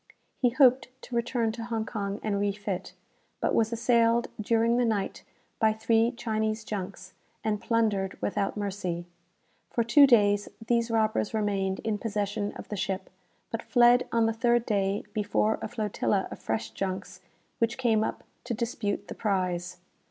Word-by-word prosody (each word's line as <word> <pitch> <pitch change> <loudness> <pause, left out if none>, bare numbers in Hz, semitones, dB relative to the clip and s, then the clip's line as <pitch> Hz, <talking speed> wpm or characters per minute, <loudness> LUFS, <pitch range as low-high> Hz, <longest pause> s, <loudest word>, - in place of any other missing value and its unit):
He 250 - +4
hoped 255 0 +4 0.2
to 245 - -6
return 235 -1 0
to 230 0 -6
Hong 225 -2 -2
Kong 200 -2 -3
and 205 -2 0
refit, 200 -2 -2 0.5
but - - 0
was 225 0 +2
assailed 235 0 +3
during 230 +2 +2
the 245 - +3
night 215 -4 -1 0.4
by 220 -2 +4
three 225 +1 +2
Chinese 220 -1 -2
junks, 185 -3 -6 0.3
and 215 -1 -1
plundered 215 -5 0
without 200 0 -1
mercy. 185 -4 -3 0.6
For 235 - +1
two 280 +5 +7
days 205 -4 +4 0.2
these 235 0 +1
robbers 220 -1 +1
remained 195 -3 0
in 215 -2 -1
possession 205 -1 -2
of - - -9
the 210 - -3
ship; 190 -1 -3 0.4
but - - -2
fled 245 -1 +4
on 230 -1 +3
the 225 - +1
third 240 +1 +2
day 200 -1 0
before 210 0 +1
a - - -3
flotilla 210 -3 -1
of - - -7
fresh 110 0 -3
junks 190 - -4 0.4
which 235 +2 +1
came 225 -4 +2
up - - -3 0.2
to 235 - -2
dispute 220 -3 -2
the - - -6
prize. 180 -4 -1
220 Hz, 160 wpm, -28 LUFS, 200-230 Hz, 0.6 s, two